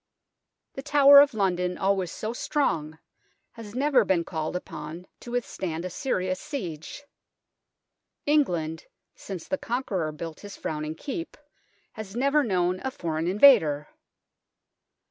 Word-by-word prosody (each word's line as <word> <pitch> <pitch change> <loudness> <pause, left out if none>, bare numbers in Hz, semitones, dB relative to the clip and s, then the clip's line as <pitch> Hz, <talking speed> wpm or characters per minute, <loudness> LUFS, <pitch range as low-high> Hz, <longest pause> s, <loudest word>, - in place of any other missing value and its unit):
The 270 - -6
Tower 280 0 +8
of 285 -4 +5
London, 180 -3 0
always 190 -3 0
so 220 +2 -4
strong, 160 - -1 0.5
has 230 -2 -11
never 270 -2 +3
been 185 -4 +1
called 160 0 -4
upon 165 0 -7
to - - -11
withstand 185 -8 -3
a 185 - -4
serious 185 -5 -2
siege. 180 - -6 1.2
England, 175 - 0 0.3
since 185 -5 -8
the 285 - -2
Conqueror 230 - -2
built 160 +1 -7
his 205 -1 -10
frowning 155 0 -4
Keep, 310 - -6 0.6
has 215 -2 -8
never 280 +4 +3
known 185 -5 0
a 265 - -1
foreign 165 -8 -3
invader. 175 - +5
190 Hz, 125 wpm, -26 LUFS, 165-255 Hz, 1.2 s, Tower